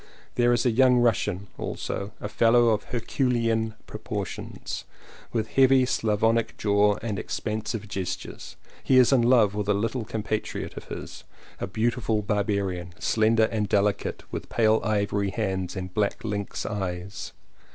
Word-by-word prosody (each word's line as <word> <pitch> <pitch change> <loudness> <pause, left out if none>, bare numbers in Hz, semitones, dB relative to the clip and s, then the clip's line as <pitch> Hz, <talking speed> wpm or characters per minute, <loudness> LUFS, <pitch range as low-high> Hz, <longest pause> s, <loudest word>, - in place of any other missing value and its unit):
There 120 0 +3
is 120 0 +2
a 125 - +4
young 125 +2 +5
Russian 105 -5 +1
also 100 +1 -4
— - - -33
a - - -4
fellow 115 +2 +4
of 105 -2 +1
Herculean 115 -2 0
proportions, - - -5 0.5
with 110 -2 -1
heavy 135 -1 +5
Slavonic 115 -1 +1
jaw 105 0 +3
and 105 -5 -2
expansive 110 0 -3
gestures; 95 -3 -5 0.3
he 130 - +4
is 130 +1 +6
in 130 - +5
love 115 -4 +4
with 105 0 -2
a 105 - +4
little 115 +4 -1
compa 110 0 -2
triot - - -6
of - - -8
his, - - -8 0.4
a - - -3
beautiful 110 -1 0
barbarian, 100 -4 -1
slender 110 0 +3
and 105 -3 -1
delicate, 100 0 0
with - - -5
pale 110 -1 +3
ivory 100 -2 0
hands 95 -1 -2
and 95 -1 -5
black 105 0 0
lynx 105 -2 -3
eyes. 95 -1 -4
110 Hz, 150 wpm, -26 LUFS, 100-115 Hz, 0.5 s, is